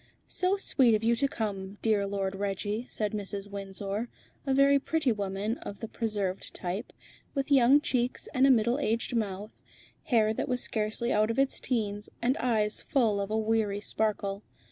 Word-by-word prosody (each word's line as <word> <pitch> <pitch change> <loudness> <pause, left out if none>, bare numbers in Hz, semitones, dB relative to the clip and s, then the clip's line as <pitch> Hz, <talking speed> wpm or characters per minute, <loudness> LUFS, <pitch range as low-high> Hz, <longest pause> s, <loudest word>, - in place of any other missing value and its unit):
"So 370 +2 +1
sweet 255 - +4
of 215 - -2
you 235 +1 +3
to 275 - +2
come, 200 -5 -4
dear 210 -3 +2
Lord 195 -1 -2
Reggie," 205 +4 -2
said 210 -2 -1
Mrs. 200 -1 -4
Windsor, 200 +3 -4 0.4
a 270 - +2
very 280 +1 +5
pretty 300 -2 0
woman 205 +2 -2
of 200 - -8
the 225 - -5
preserved 205 -5 -3
type, 185 +6 -4 0.4
with 275 +1 -2
young 270 +1 +6
cheeks 250 -3 -1
and 260 +1 +4
a - - +5
middle 240 +1 +3
aged 230 -2 -1
mouth, 205 -1 -3 0.4
hair 220 -3 +3
that - - -3
was 250 0 0
scarcely 220 +2 -1
out 215 +1 +3
of 230 - -2
its 275 0 +2
teens, 210 -4 -2
and 250 +3 +1
eyes 220 -4 0
full 220 -7 +1
of 200 - -3
a 215 - 0
weary 220 -2 +1
sparkle. 205 -1 -1
215 Hz, 175 wpm, -29 LUFS, 200-245 Hz, 0.4 s, young